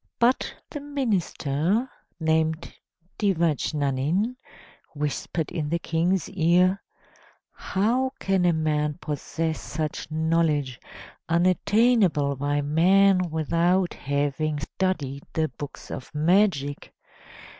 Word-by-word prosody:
But 240 Hz, +2 st, +2 dB, 0.2 s
the 295 Hz, -, -5 dB
minister, 215 Hz, -, -1 dB, 0.3 s
named 160 Hz, 0 st, 0 dB, 0.5 s
Devajnanin, 165 Hz, -, 0 dB, 0.6 s
whispered 150 Hz, +2 st, -3 dB
in 155 Hz, -4 st, -3 dB
the 170 Hz, -, +1 dB
King's 170 Hz, +2 st, 0 dB
ear: 180 Hz, +2 st, +3 dB, 0.7 s
"How 240 Hz, +7 st, 0 dB
can 195 Hz, -2 st, +1 dB
a 175 Hz, -, +5 dB
man 150 Hz, -2 st, 0 dB
possess 160 Hz, +2 st, -3 dB
such 155 Hz, -1 st, -4 dB
knowledge 155 Hz, -5 st, 0 dB, 0.5 s
unattainable 185 Hz, -, +3 dB
by 145 Hz, +2 st, 0 dB
men 185 Hz, +4 st, +4 dB
without 170 Hz, +3 st, +1 dB
having 145 Hz, +2 st, -1 dB
studied 150 Hz, -4 st, -2 dB
the 160 Hz, -1 st, 0 dB
books 145 Hz, -, -9 dB
of 130 Hz, -, -6 dB
magic? 155 Hz, -3 st, +1 dB
165 Hz, 90 wpm, -25 LUFS, 150-190 Hz, 0.7 s, a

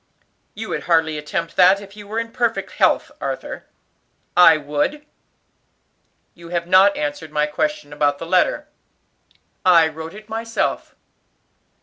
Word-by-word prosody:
"You 220 Hz, +1 st, -6 dB
would -, -, -4 dB
hardly 160 Hz, -3 st, +2 dB
attempt 165 Hz, +3 st, -4 dB
that 190 Hz, +2 st, +6 dB
if 200 Hz, 0 st, -13 dB
you 205 Hz, -1 st, -11 dB
were 215 Hz, +2 st, -5 dB
in 230 Hz, 0 st, -3 dB
perfect 235 Hz, -2 st, -1 dB
health, -, -, +1 dB
Arthur." -, -, -5 dB, 0.7 s
"I 170 Hz, -3 st, +7 dB
would." 150 Hz, -, -2 dB, 1.3 s
"You 170 Hz, -1 st, -13 dB
have 170 Hz, -1 st, -2 dB
not 190 Hz, +3 st, +5 dB
answered 150 Hz, +1 st, -4 dB
my 150 Hz, 0 st, +1 dB
question 150 Hz, -, -3 dB
about 145 Hz, -1 st, +1 dB
the 165 Hz, -, -7 dB
letter. 185 Hz, -, +1 dB, 1.0 s
"I 170 Hz, -3 st, +6 dB
wrote 160 Hz, +3 st, -8 dB
it 215 Hz, 0 st, -12 dB
myself." 225 Hz, +1 st, -3 dB
175 Hz, 135 wpm, -20 LUFS, 155-215 Hz, 1.3 s, I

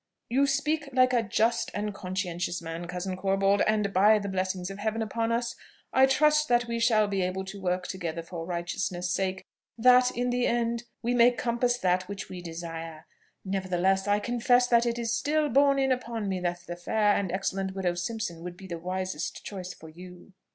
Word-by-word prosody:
"You 275 Hz, +3 st, +3 dB
speak 290 Hz, +2 st, 0 dB
like 255 Hz, 0 st, +4 dB
a 240 Hz, -, +4 dB
just 225 Hz, +2 st, +1 dB
and 210 Hz, 0 st, -2 dB
conscientious 180 Hz, -3 st, -3 dB
man, 165 Hz, +1 st, -6 dB
cousin 180 Hz, +1 st, -4 dB
Corbold; 195 Hz, +1 st, +2 dB
and, 210 Hz, -2 st, +1 dB
by 210 Hz, +4 st, +6 dB
the 200 Hz, -1 st, -3 dB
blessing 185 Hz, -1 st, -2 dB
of 195 Hz, -, -8 dB
Heaven 220 Hz, +1 st, -1 dB
upon 225 Hz, +2 st, -1 dB
us, 235 Hz, 0 st, -1 dB, 0.4 s
I 265 Hz, 0 st, +6 dB
trust 300 Hz, +2 st, +3 dB
that 240 Hz, -2 st, +3 dB
we 235 Hz, 0 st, -3 dB
shall 220 Hz, -2 st, +3 dB
be 195 Hz, -1 st, -1 dB
so -, -, +2 dB
able 190 Hz, +1 st, -4 dB
to 195 Hz, +1 st, -8 dB
work 180 Hz, 0 st, -1 dB
together 170 Hz, -4 st, -4 dB
for 165 Hz, 0 st, -7 dB
righteousness' 175 Hz, +1 st, -3 dB
sake, 190 Hz, 0 st, -1 dB, 0.3 s
that 250 Hz, +1 st, +6 dB
in 245 Hz, 0 st, 0 dB
the 245 Hz, 0 st, +1 dB
end 235 Hz, 0 st, 0 dB, 0.2 s
we 240 Hz, +1 st, +1 dB
may 240 Hz, 0 st, +6 dB
compass 245 Hz, 0 st, 0 dB
that 185 Hz, -3 st, +1 dB
which 200 Hz, -1 st, -6 dB
we 180 Hz, -1 st, -7 dB
desire. 165 Hz, -1 st, -7 dB, 0.4 s
Nevertheless, 190 Hz, 0 st, 0 dB
I 205 Hz, 0 st, +3 dB
confess 245 Hz, +2 st, +2 dB
that 235 Hz, 0 st, +4 dB
it 235 Hz, 0 st, -1 dB
is 230 Hz, -1 st, -1 dB
still 295 Hz, +5 st, +1 dB
borne 275 Hz, +2 st, +4 dB
in 270 Hz, -1 st, +2 dB
upon 235 Hz, -4 st, -2 dB
me 190 Hz, -1 st, -1 dB
that 175 Hz, -1 st, -2 dB
the 175 Hz, -, -5 dB
fair 205 Hz, +3 st, +2 dB
and 190 Hz, -3 st, -1 dB
excellent 190 Hz, 0 st, -2 dB
widow 185 Hz, -2 st, 0 dB
Simpson 175 Hz, -1 st, -4 dB
would 175 Hz, 0 st, -7 dB
be 195 Hz, -, -11 dB
the 170 Hz, -3 st, -6 dB
wisest 185 Hz, -2 st, -4 dB
choice 185 Hz, -3 st, -6 dB
for 160 Hz, -, -12 dB
you." 180 Hz, +3 st, -13 dB
200 Hz, 200 wpm, -28 LUFS, 180-235 Hz, 0.4 s, by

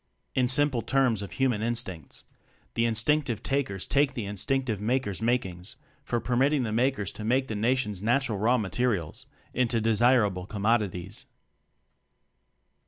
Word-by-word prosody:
^ -, -, -50 dB, 0.3 s
In 125 Hz, -1 st, +2 dB
simple 130 Hz, -1 st, +3 dB
terms 130 Hz, -6 st, +1 dB
of 95 Hz, -4 st, -7 dB
human 130 Hz, -5 st, +1 dB
instincts: 110 Hz, -, -3 dB, 0.5 s
The 115 Hz, -, +1 dB
Instinctive 115 Hz, +2 st, 0 dB
Takers 130 Hz, -9 st, -2 dB
take 140 Hz, 0 st, +2 dB
the 115 Hz, -5 st, -3 dB
In 100 Hz, +1 st, -5 dB
stinctive 115 Hz, +1 st, -1 dB
Makers' 110 Hz, -2 st, -1 dB
makings 95 Hz, -7 st, -1 dB, 0.3 s
for 120 Hz, -, -1 dB
permitt 125 Hz, +5 st, +1 dB
ing 140 Hz, -4 st, +1 dB
the 110 Hz, -, -2 dB
Makers 115 Hz, -3 st, 0 dB
to 110 Hz, -, -8 dB
make 130 Hz, +4 st, +1 dB
the 110 Hz, -, -4 dB
Nation's 110 Hz, -3 st, 0 dB
natural 120 Hz, -1 st, +1 dB
raw 120 Hz, +5 st, +3 dB
materials 110 Hz, -, -2 dB, 0.3 s
into 120 Hz, -2 st, +1 dB
desirable 110 Hz, -4 st, +2 dB
commodities. 105 Hz, -4 st, -1 dB
115 Hz, 145 wpm, -27 LUFS, 105-130 Hz, 0.5 s, simple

